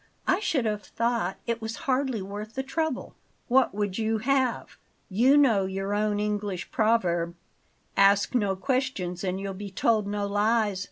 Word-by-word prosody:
"I 365 - +2
should 295 - 0
have 210 -1 -1
thought 230 -6 -1
it 235 -1 -2
was 220 +1 -4
hardly 260 -5 0
worth 205 +3 -7
the 265 - -2
trouble." 315 0 -2 0.4
"What 255 -3 +3
would 205 -1 -2
you 220 0 +1
have? 260 +1 0 0.3
You 245 +9 +4
know 225 -9 +4
your 195 +1 -3
own 210 0 +1
English 205 -3 -2
proverb: 175 -7 +1 0.6
'Ask 200 +3 +4
no 205 -6 +1
questions 200 -7 -2
and 185 0 -1
you'll 195 0 -4
be 200 +1 -7
told 215 +2 +1
no 205 0 -2
lies.' 205 0 +1
210 Hz, 160 wpm, -27 LUFS, 195-240 Hz, 0.6 s, You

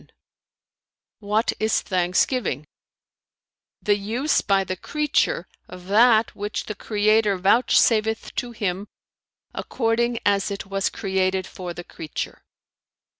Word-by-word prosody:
Q - - -23 1.1
"What 215 +1 0
is 220 +1 +1
thanksgiving?" 180 - 0 1.2
"The 205 - +3
use 235 +9 0
by 195 -1 +2
the 185 0 -4
creature 300 - 0 0.2
of 180 -1 -11
that 225 +1 +4
which 205 +1 -4
the 215 - -4
Creator 210 -1 +2
vouchsafeth 220 +2 +3
to 245 - -3
him, 200 -3 -3 0.7
according 235 0 0
as 200 -1 +2
it 200 -1 -5
was 195 0 -1
created 190 -1 -1
for 180 -2 -7
the 175 - -7
creature." 155 -3 -6
205 Hz, 115 wpm, -23 LUFS, 190-225 Hz, 1.2 s, that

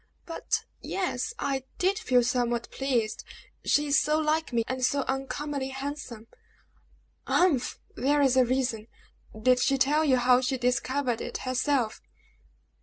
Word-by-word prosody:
"But 330 - -2 0.2
ye - - -6
e 375 -2 0
s, 250 - -3
I 275 - -2
did 385 +3 +1
feel 250 - +3
somewhat 240 -1 -1
pleased 245 -5 -1 0.4
she 295 - +2
is 285 0 +4
so 300 +1 +1
like 315 0 0
me, 235 -1 +1
and 260 0 -3
so 280 +3 +2
uncommonly 270 +1 -3
handsome!" 270 -4 -6 1.0
"Humph! 315 -9 +2 0.2
there's 275 0 +2
a 260 - +6
reason! 245 -3 -1 0.5
Did 250 +2 +4
she 275 +2 +2
tell 290 +4 +3
you 270 -4 +4
how 250 0 +4
she 260 +1 -1
discovered 250 0 0
it - - -4
herself?" 255 -2 0
265 Hz, 145 wpm, -27 LUFS, 245-290 Hz, 1.0 s, a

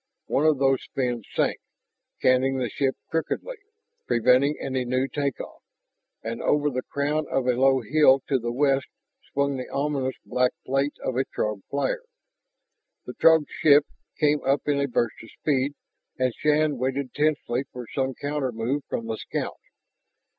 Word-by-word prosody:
One 150 +3 +2
of 155 -2 +4
those 135 -1 +2
fins 120 -4 -1
sank, - - +1 0.6
canting 130 +1 +3
the 125 -3 -1
ship 135 -2 0 0.2
crookedly, 320 - -2 0.5
preventing 130 +5 +3
any 130 -1 -2
new 130 +2 0
take 140 -1 -2
off. - - -9 0.6
And 115 +1 -4
over 150 0 +2
the 130 0 -2
crown 145 +3 -1
of 135 - 0
a 125 - +4
low 135 +1 +3
hill 135 +3 +5
to 135 -2 +2
the 120 0 -3
west 135 +1 +2 0.4
swung 140 -1 0
the 125 - -6
ominous 140 -2 -1
black 125 0 +1
plate 135 +2 0
of 130 - -2
a 135 - +3
Throg 105 -2 -3
flyer. 140 - -1 1.0
The - - -7
Throg 160 -2 +5
ship 145 -1 +6 0.3
came 150 -1 +3
up 135 +2 +1
in 145 -1 +2
a 140 - +1
burst 120 -3 -1
of 115 - -12
speed, 140 -1 0 0.4
and 130 -2 +1
Shann 150 -1 +1
waited 130 0 -2
tensely 145 -4 0
for 125 -1 -7
some 135 -1 -1
countermove 135 -2 -2
from 115 - -3
the 110 -1 -3
scout. - - -4
135 Hz, 160 wpm, -25 LUFS, 125-145 Hz, 1.0 s, ship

